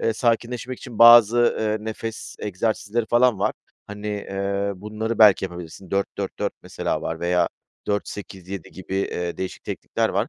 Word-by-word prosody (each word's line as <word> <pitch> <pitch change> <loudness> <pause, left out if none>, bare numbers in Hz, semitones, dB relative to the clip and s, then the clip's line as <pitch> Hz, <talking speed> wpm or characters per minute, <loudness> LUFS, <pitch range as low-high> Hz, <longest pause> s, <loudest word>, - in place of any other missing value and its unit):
eee, 115 - +1
sakinleşmek 120 +2 -1
için 120 -4 -9
bazı, 120 0 +8
eee, 110 0 -1
nefes 110 0 -6
egzersizleri 110 +3 -1
falan 120 -2 +4
var. 100 - +1 0.3
Hani, 105 0 -7
eee, 100 -1 -2
bunları 110 +3 -4
belki 105 -3 +7
yapabilirsin, 90 0 -8
4-4-4 100 0 -2
mesela - - -3
var 80 0 -4
veya 85 0 +2 0.4
4-8-7 100 -3 -5
gibi, 95 0 -7
eee, 90 -3 -2
değişik 95 - -5
teknikler - - -1
var. - - 0
105 Hz, 140 wpm, -23 LUFS, 95-115 Hz, 0.4 s, bazı